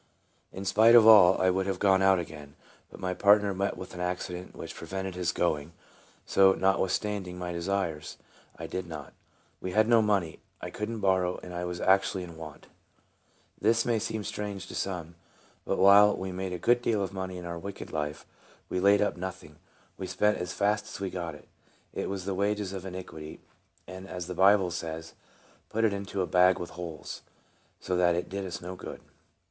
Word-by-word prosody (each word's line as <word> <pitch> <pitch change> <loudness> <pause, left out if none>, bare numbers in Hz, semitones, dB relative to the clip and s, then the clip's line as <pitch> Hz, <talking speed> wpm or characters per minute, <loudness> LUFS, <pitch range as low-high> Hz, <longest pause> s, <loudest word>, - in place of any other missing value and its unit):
In 95 +1 -7
spite 110 +4 +6
of 115 -2 +8
all, 100 -5 +8
I 95 0 +3
would 95 +1 -1
have 95 -2 -1
gone 95 0 +3
out 95 0 +5
again> 75 -4 -7 0.3
but - - -13
my 90 0 -2
partner 100 +1 +4
met 100 +1 -2
with 95 - -9
an 90 - -8
accident 90 0 -4
which - - -7
prevented 95 0 -5
his 90 -1 -1
going, 80 -2 -1 0.5
so, 95 -1 +5
notwithstanding 95 0 0
my 90 -1 -4
desires, 85 -2 -3 0.4
I - - -6
did 95 -1 -5
not. 75 -5 -8 0.5
We 95 - -4
had 110 +2 +4
no 115 -1 +5
money; 100 -7 0 0.2
I - - -6
could 105 +1 -4
n't 115 -2 -5
borrow, 95 -2 +1
and 90 - -8
I 90 0 -3
was 90 0 -4
actually 95 0 +2
in 85 -2 -10
want. 80 -3 -10 0.9
This 115 +2 +2
may 115 -2 +1
seem 110 0 -3
strange 100 -2 -5
to - - -8
some; 85 -4 -4 0.5
but - - -1
while 100 +2 +7
we 95 0 -4
made 95 0 -4
a 90 - -3
good 120 +7 +3
deal 110 -4 +1
of 95 0 -5
money 95 -1 -5
in 90 - -8
our 85 0 -5
wicked 100 +3 -8
life, 75 -1 -3 0.4
we 90 - -1
laid 100 +2 +5
up 105 - -1
nothing, 90 -4 -7 0.4
but 95 - -5
spent 105 +3 +1
as 90 -2 -4
fast 105 +1 0
as - - -8
we 95 -2 -3
got 85 -4 -5
it. - - -16 0.5
It - - -3
was 95 -2 -4
the 100 - -1
wages 100 0 -1
of 95 -1 -6
iniquity, 90 -4 -8 0.5
and 95 +1 -9
as 90 -2 -5
the 90 - -5
Bible 95 0 +4
says, 80 -1 -5 0.3
" - - -31
put 115 +1 +1
into 100 -2 -1
a - - 0
bag 90 +1 +4
with 85 - -6
holes," 85 -3 -7 0.6
so 90 - -2
that 90 -1 +3
it 90 - -3
did 100 0 -4
us 85 -1 -6
no 90 +1 -6
good. - - -8
95 Hz, 200 wpm, -28 LUFS, 90-100 Hz, 0.9 s, of